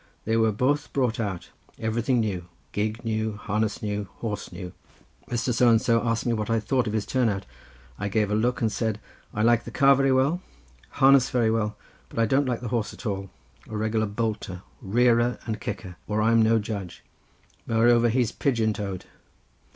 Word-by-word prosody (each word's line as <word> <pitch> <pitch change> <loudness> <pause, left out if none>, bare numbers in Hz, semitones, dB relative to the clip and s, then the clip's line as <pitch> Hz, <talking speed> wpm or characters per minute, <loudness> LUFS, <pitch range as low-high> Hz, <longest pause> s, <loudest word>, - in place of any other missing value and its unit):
They 110 - +1
were 110 -1 +3
both 140 +7 0
brought 125 -5 0
out—everything 115 +4 -2
new: 95 -5 -3 0.2
gig 110 +3 -2
new, 110 -1 -1
harness 105 +1 -2
new, 105 -1 -1
and 105 -1 -4
horse 105 +2 -6
new. 90 -2 -7 0.6
Mr. 120 +1 0
So 120 +1 +4
and 115 -1 +5
so 115 0 +2
asked 115 -1 0
me 120 - +1
what 110 -1 -2
I 115 0 +2
thought 120 +2 0
of 105 - -2
his 110 -2 -1
turn 125 -3 +1
out. 100 -6 -3 0.5
I 105 - -2
gave 105 0 +1
a - - +1
look 120 +4 0
and 110 -2 +1
said, 110 -1 -1 0.3
'I 105 - -1
like 120 0 +4
the - - -7
car 140 0 +5
very 135 0 +2
well, 135 +7 +2 0.5
harness 135 -1 +5
very 115 -3 +2
well, 105 -1 -1 0.3
but - - -13
I 115 - +4
don't 135 +4 +2
like 120 -2 -1
the 120 - -4
horse 115 -2 -2
at - - -13
all: 100 -2 -3 0.4
a 110 - -4
regular 110 0 0
bolter, 105 -4 -3 0.2
rearer, 120 +3 +3
and 110 -2 -4
kicker, 90 -5 -6
or 105 0 0
I'm 115 +1 +4
no 110 +1 +4
judge; 100 -4 -5 0.6
moreover, 120 +1 +4
he's 120 -1 +1
pigeon 115 -5 +1
toed. 100 -3 -5
110 Hz, 190 wpm, -26 LUFS, 105-120 Hz, 0.6 s, and